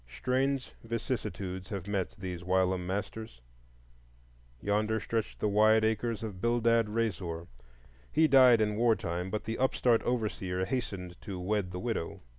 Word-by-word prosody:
Strange 130 Hz, -, 0 dB
vicissitudes 105 Hz, -5 st, -4 dB
have 95 Hz, -3 st, -4 dB
met 100 Hz, -3 st, -2 dB
these 90 Hz, -3 st, -5 dB
whilom 95 Hz, 0 st, +1 dB
masters. 105 Hz, -, -4 dB, 1.2 s
Yonder 105 Hz, -, 0 dB
stretch 115 Hz, -1 st, -2 dB
the -, -, 0 dB
wide 110 Hz, +2 st, +5 dB
acres 110 Hz, +1 st, -1 dB
of 100 Hz, -4 st, -6 dB
Bildad 115 Hz, -1 st, +3 dB
Reasor; 95 Hz, -7 st, -2 dB, 0.7 s
he 160 Hz, 0 st, +4 dB
died 130 Hz, -5 st, +7 dB
in 105 Hz, -1 st, +1 dB
war 115 Hz, -1 st, +4 dB
time, 90 Hz, 0 st, -3 dB
but 105 Hz, +2 st, -3 dB
the 115 Hz, +1 st, -4 dB
upstart 125 Hz, -2 st, +3 dB
overseer 100 Hz, -6 st, -1 dB
hastened 95 Hz, -6 st, -4 dB
to 95 Hz, -4 st, -6 dB
wed 100 Hz, +1 st, -1 dB
the 90 Hz, 0 st, -5 dB
widow. 115 Hz, -6 st, -3 dB
105 Hz, 140 wpm, -30 LUFS, 95-115 Hz, 1.2 s, died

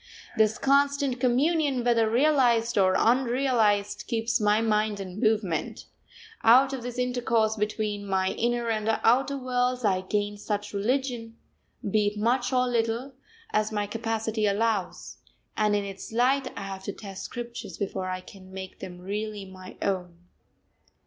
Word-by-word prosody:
This 220 Hz, 0 st, +3 dB
constant 280 Hz, -1 st, +2 dB
communion, 275 Hz, +1 st, +2 dB
whether 230 Hz, -2 st, +3 dB
realised 240 Hz, -3 st, +3 dB
or 185 Hz, -2 st, +4 dB
unrealised, 235 Hz, -4 st, +2 dB
keeps 230 Hz, 0 st, 0 dB
my 210 Hz, +1 st, +3 dB
mind 215 Hz, -2 st, +1 dB
in 190 Hz, 0 st, -7 dB
movement; 215 Hz, -7 st, 0 dB, 0.6 s
out 260 Hz, +4 st, +6 dB
of 265 Hz, -, -4 dB
this 245 Hz, +1 st, -6 dB
intercourse 240 Hz, -3 st, +1 dB
between 210 Hz, -1 st, -2 dB
my 190 Hz, -1 st, +1 dB
inner 240 Hz, 0 st, -1 dB
and 215 Hz, 0 st, -1 dB
outer 270 Hz, +4 st, +3 dB
worlds 250 Hz, -1 st, 0 dB
I 185 Hz, -2 st, +2 dB
gain 205 Hz, +2 st, -2 dB
such 205 Hz, 0 st, -3 dB
religion, 230 Hz, +1 st, -2 dB, 0.5 s
be 210 Hz, +1 st, +2 dB
it 205 Hz, +1 st, -2 dB
much 245 Hz, +4 st, +1 dB
or 255 Hz, -1 st, +2 dB
little, 235 Hz, +2 st, -1 dB, 0.4 s
as 215 Hz, 0 st, +1 dB
my 205 Hz, -1 st, -1 dB
capacity 225 Hz, 0 st, -1 dB
allows: 205 Hz, -1 st, -1 dB, 0.4 s
and 210 Hz, -1 st, +2 dB
in 205 Hz, -, 0 dB
its 195 Hz, +1 st, -8 dB
light 255 Hz, +3 st, +2 dB
I 200 Hz, -, -4 dB
have 195 Hz, -1 st, -6 dB
to 200 Hz, -, -3 dB
test 195 Hz, -3 st, -8 dB
scriptures 235 Hz, -7 st, -7 dB
before 190 Hz, -2 st, -3 dB
I 185 Hz, 0 st, -3 dB
can 185 Hz, 0 st, -14 dB
make 190 Hz, 0 st, -8 dB
them 180 Hz, -1 st, -8 dB
really 205 Hz, +1 st, -4 dB
my 185 Hz, -1 st, -12 dB
own. 180 Hz, -3 st, -2 dB
220 Hz, 150 wpm, -27 LUFS, 205-245 Hz, 0.6 s, out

